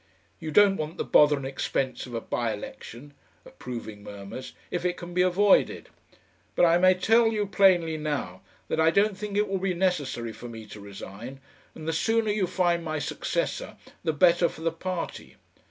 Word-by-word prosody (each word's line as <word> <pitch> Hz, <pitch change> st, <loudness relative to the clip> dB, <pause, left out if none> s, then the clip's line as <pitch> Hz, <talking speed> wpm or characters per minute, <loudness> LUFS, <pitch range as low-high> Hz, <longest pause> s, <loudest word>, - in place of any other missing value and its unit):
You 160 Hz, -, -5 dB
don't 195 Hz, +4 st, +5 dB
want 155 Hz, +2 st, -4 dB
the -, -, -1 dB
bother 150 Hz, -1 st, +5 dB
and 135 Hz, -, -6 dB
expense 135 Hz, -1 st, -2 dB
of 120 Hz, -, -7 dB
a 115 Hz, -, -2 dB
bye 115 Hz, -1 st, -2 dB
election 120 Hz, +6 st, -10 dB, 0.3 s
(approving 115 Hz, -4 st, -8 dB
murmurs) 100 Hz, +4 st, -8 dB, 0.2 s
if 175 Hz, -, -2 dB
it 180 Hz, 0 st, 0 dB
can 175 Hz, 0 st, -8 dB
be 180 Hz, -, +2 dB
avoided. 190 Hz, +2 st, +3 dB, 0.7 s
But -, -, +5 dB
I 170 Hz, +1 st, +4 dB
may 185 Hz, +1 st, +5 dB
tell 225 Hz, +5 st, +4 dB
you 215 Hz, -2 st, 0 dB
plainly 180 Hz, -5 st, +3 dB
now 145 Hz, -12 st, -3 dB, 0.3 s
that -, -, -1 dB
I 160 Hz, 0 st, +5 dB
don't 200 Hz, +4 st, +2 dB
think 205 Hz, 0 st, -4 dB
it 210 Hz, 0 st, +2 dB
will 195 Hz, -1 st, -1 dB
be 185 Hz, -1 st, -1 dB
necessary 145 Hz, -11 st, -1 dB
for 120 Hz, +2 st, -9 dB
me 110 Hz, -1 st, -9 dB
to 105 Hz, 0 st, -11 dB
resign, 100 Hz, +5 st, -9 dB, 0.4 s
and 155 Hz, -1 st, -9 dB
the 160 Hz, -, 0 dB
sooner 225 Hz, +5 st, +1 dB
you 205 Hz, -3 st, 0 dB
find 175 Hz, -2 st, +1 dB
my 155 Hz, -1 st, -3 dB
successor -, -, -3 dB, 0.3 s
the 165 Hz, -, +1 dB
better 170 Hz, +2 st, +4 dB
for -, -, -12 dB
the 165 Hz, 0 st, 0 dB
party. 175 Hz, +1 st, -5 dB
165 Hz, 185 wpm, -27 LUFS, 130-185 Hz, 0.7 s, don't